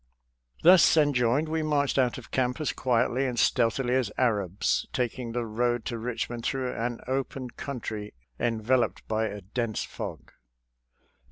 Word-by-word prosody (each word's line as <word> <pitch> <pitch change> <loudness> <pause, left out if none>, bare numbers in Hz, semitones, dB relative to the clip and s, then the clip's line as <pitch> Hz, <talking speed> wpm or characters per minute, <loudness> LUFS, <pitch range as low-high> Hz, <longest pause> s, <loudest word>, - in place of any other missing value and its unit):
Thus 175 -1 +7
en 145 -2 +4
joined, 125 +5 +2
we 160 +1 -1
marched 145 -3 +1
out 125 -2 +2
of - - -11
camp 125 +2 0
as 155 - -1
quietly 125 +1 +1
and 125 -2 -3
stealthily 120 +2 +2
as 130 -5 +1
Arabs, 105 -6 +1
taking 125 -1 -2
the 120 0 -2
road 120 +1 0
to 120 - -3
Kichmond 120 0 -4
through 130 -1 -1
an 120 +1 -3
open 130 -1 -3
country 110 - -6 0.2
enveloped 120 +2 0
by 110 0 0
a 105 -1 -6
dense 110 +3 -2
fog. - - -7
125 Hz, 150 wpm, -27 LUFS, 115-130 Hz, 0.2 s, Thus